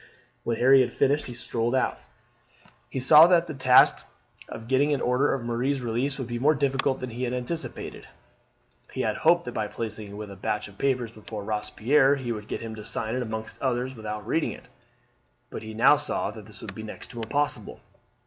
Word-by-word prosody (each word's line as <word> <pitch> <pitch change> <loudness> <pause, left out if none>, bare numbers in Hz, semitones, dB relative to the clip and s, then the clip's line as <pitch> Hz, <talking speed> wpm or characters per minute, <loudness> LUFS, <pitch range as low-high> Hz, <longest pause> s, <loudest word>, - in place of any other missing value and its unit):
When 115 -1 -1
Harry 135 +2 +6
had 125 - 0
finished 145 +2 +1
he 120 - -7
strolled 120 +1 -1
out. 130 - 0 0.9
He - - -3
saw 150 +5 +8
that 175 -1 +4
the 155 - -6
task 130 -2 +5 0.5
of 115 - -8
getting 135 +3 +2
an - - -3
order 130 +3 +2
for 125 - -8
Marie's 125 +4 -1
release 125 +3 -2
would 130 - -4
be 120 0 -4
more 150 +5 +4
difficult 135 -1 +1
than 130 -2 -6
he 120 +2 -6
had 125 -1 -1
anticipated. 125 +7 -5 0.8
He - - -3
had - - -1
hoped - - +3
that - - -4
by - - -2
placing 110 -2 -5
it - - -10
with 105 0 -7
a - - -9
batch 105 +2 -2
of 100 -1 -17
papers 125 -4 0
before 110 -1 -8
Robespierre 130 +6 +2
he 130 -4 -4
would 105 -2 -5
get - - -4
him 115 -1 -6
to 105 - -8
sign 110 0 -2
it 130 - -1
among 110 -2 -4 0.2
others 130 0 -1
without 105 -3 -6
reading 155 +7 0
it, - - -13 0.9
but - - -6
he 110 0 -8
now 125 +6 +6
saw 145 +1 -1
that 110 -2 -11
this 105 -3 -10
would 100 - -7
be 110 - -8
next 110 +2 -9
to 120 - -12
impossible. 145 +6 -2
120 Hz, 210 wpm, -26 LUFS, 110-135 Hz, 0.9 s, saw